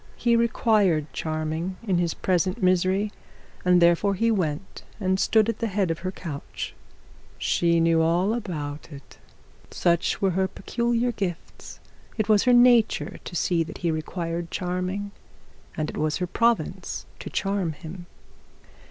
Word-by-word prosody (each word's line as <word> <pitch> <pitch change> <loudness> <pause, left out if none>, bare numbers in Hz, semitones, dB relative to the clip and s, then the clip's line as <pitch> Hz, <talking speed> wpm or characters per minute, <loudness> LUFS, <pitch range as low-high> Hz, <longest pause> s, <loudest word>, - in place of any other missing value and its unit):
He 235 -1 +2
required 210 - +2
charming 160 +3 -3
in 190 -6 +1
his 170 -2 0
present 185 +3 0
misery, 185 +3 +2 0.5
and 180 -1 +5
therefore 175 +4 +4
he 230 +4 +2
went 180 -3 -2 0.2
and 190 -2 +1
stood 220 0 +3
at 230 -2 -2
the 230 - 0
head 195 -4 0
of 165 - -3
her 185 +1 -3
couch. 155 -7 -6 0.6
She 170 -1 +2
knew 165 0 +3
all 175 +6 +2
about 155 -10 -5
it. 140 -2 -13 0.5
Such 170 -1 +1
were 195 -1 +2
her 190 +2 +1
peculiar 235 +4 -1
gifts. 190 -7 -6 0.4
It 215 -2 0
was 215 0 +4
her 250 - +5
nature 235 -8 +4
to - - -8
see 170 0 +1
that 160 - -9
he 170 - +3
required 165 +1 -3
charming, 185 +3 -3 0.7
and 155 -1 -1
it - - -6
was 155 0 0
her 180 - -1
province 230 +6 0
to - - -7
charm 195 -4 -1
him. 175 +3 -10
185 Hz, 150 wpm, -25 LUFS, 165-205 Hz, 0.7 s, and